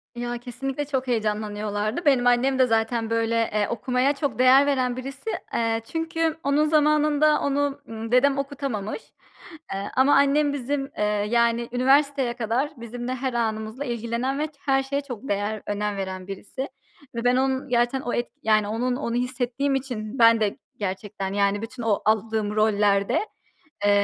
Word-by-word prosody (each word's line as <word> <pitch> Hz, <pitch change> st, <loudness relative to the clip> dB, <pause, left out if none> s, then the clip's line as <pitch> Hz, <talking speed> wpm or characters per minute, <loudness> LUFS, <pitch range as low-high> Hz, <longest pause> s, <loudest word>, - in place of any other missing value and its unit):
Ya 240 Hz, 0 st, -3 dB
kesinlikle 260 Hz, +4 st, -4 dB
çok 265 Hz, -2 st, -2 dB
heyecanlanıyorlardı. 215 Hz, +3 st, -2 dB
Benim 250 Hz, -4 st, +4 dB
annem 260 Hz, +2 st, +3 dB
de 255 Hz, -, +6 dB
zaten 225 Hz, 0 st, 0 dB
böyle, 230 Hz, 0 st, 0 dB, 0.2 s
eee, 210 Hz, -1 st, +1 dB
okumaya 250 Hz, +4 st, +1 dB
çok 275 Hz, -6 st, -3 dB
değer 260 Hz, +2 st, +7 dB
veren 255 Hz, -3 st, 0 dB
birisi. 270 Hz, -, -6 dB, 0.2 s
Eee, 225 Hz, -1 st, 0 dB
çünkü 325 Hz, 0 st, -1 dB
onun 285 Hz, +2 st, +3 dB
zamanında 305 Hz, 0 st, +3 dB
onu, 285 Hz, 0 st, 0 dB
ımm, 225 Hz, +1 st, -6 dB
dedem 275 Hz, +2 st, +4 dB
okutamamış, 275 Hz, -, -3 dB, 0.7 s
eee, 195 Hz, +1 st, -4 dB
ama 270 Hz, +3 st, +5 dB
annem 285 Hz, +1 st, +3 dB
bizim, 275 Hz, +1 st, -3 dB
eee, 210 Hz, -, 0 dB, 0.3 s
yani 235 Hz, 0 st, +2 dB
üniversiteye 270 Hz, 0 st, +3 dB
kadar 240 Hz, +4 st, 0 dB
bizimle 240 Hz, +2 st, -5 dB
her 260 Hz, -1 st, -3 dB
anımızla 220 Hz, +2 st, -2 dB
ilgilenen 240 Hz, +3 st, -2 dB
ve 305 Hz, -, 0 dB
ç 300 Hz, -, -22 dB
her 270 Hz, -1 st, +1 dB
şeye 280 Hz, +1 st, -2 dB
çok 265 Hz, -2 st, -8 dB
değer 205 Hz, +2 st, -1 dB
önem 205 Hz, 0 st, -2 dB
veren 190 Hz, -1 st, -5 dB
birisi 200 Hz, +6 st, -7 dB, 0.5 s
ve 230 Hz, -, -3 dB
ben 245 Hz, 0 st, +4 dB
onun 265 Hz, +1 st, 0 dB
gerçekten 240 Hz, +2 st, +1 dB
o 245 Hz, -, -3 dB
et 240 Hz, -, -1 dB, 0.4 s
onun 245 Hz, +4 st, -1 dB
onu 235 Hz, -3 st, -3 dB
hissettiğim 255 Hz, +2 st, -1 dB
için 245 Hz, -3 st, -4 dB
ben 230 Hz, -1 st, +7 dB
de 205 Hz, -2 st, 0 dB, 0.2 s
gerçekten 195 Hz, 0 st, -4 dB
yani 200 Hz, +1 st, +1 dB
bütün 240 Hz, +1 st, -7 dB
o 215 Hz, -3 st, +1 dB
aldığım 215 Hz, -1 st, +1 dB
rollerde, 205 Hz, -2 st, +2 dB, 0.7 s
eee, 205 Hz, -, +5 dB
245 Hz, 155 wpm, -24 LUFS, 220-275 Hz, 0.7 s, değer